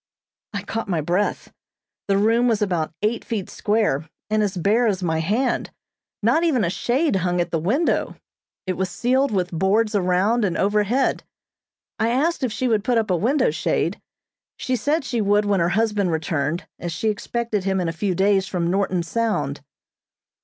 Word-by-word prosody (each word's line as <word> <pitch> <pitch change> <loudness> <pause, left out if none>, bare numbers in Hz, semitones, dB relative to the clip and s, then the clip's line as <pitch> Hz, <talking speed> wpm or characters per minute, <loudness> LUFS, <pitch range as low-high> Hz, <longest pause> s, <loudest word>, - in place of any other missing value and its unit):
I 200 - -3
caught 225 0 -4
my 175 -4 +1
breath. 175 +7 -1 0.5
The 195 -1 +2
room 230 +4 +3
was 225 -3 +2
about 175 -7 -1
eight 225 +2 0
feet 210 -5 -4
square, 205 -9 0 0.2
and 215 0 +2
as 200 -2 -1
bare 215 +7 +2
as 195 -3 -1
my 160 -2 0
hand. 220 +10 0 0.5
Not 245 +10 +3
even 280 -10 +2
a 170 - 0
shade 255 - +1
hung 180 -1 0
at 175 - -1
the 165 - 0
window. 250 - 0 0.5
It 185 -2 -2
was 190 0 -1
ceiled 260 +8 +1
with 185 -4 -1
boards 200 +6 +1
around 200 +4 +2
and 185 -4 0
overhead. 210 +6 +1 0.8
I 225 +1 +2
asked 300 +8 +1
if 250 - 0
she 255 +4 -1
would 220 -4 +1
put 245 +1 +1
up 220 -3 0
a - - +3
window 245 - +2
shade. 160 +3 -1 0.6
She 255 - -1
said 290 +5 0
she 240 -3 -1
would 205 +1 +2
when 200 -2 +2
her 170 0 +2
husband 210 -1 +1
returned, 160 0 -2
as 175 - -4
she 190 +7 -1
expected 215 -1 -2
him 190 -1 +1
in 180 - -1
a 165 - -2
few 185 +2 -1
days 195 +1 +2
from 175 -2 -1
Norton 190 -2 0
Sound. 165 -8 -1
205 Hz, 180 wpm, -22 LUFS, 180-230 Hz, 0.8 s, room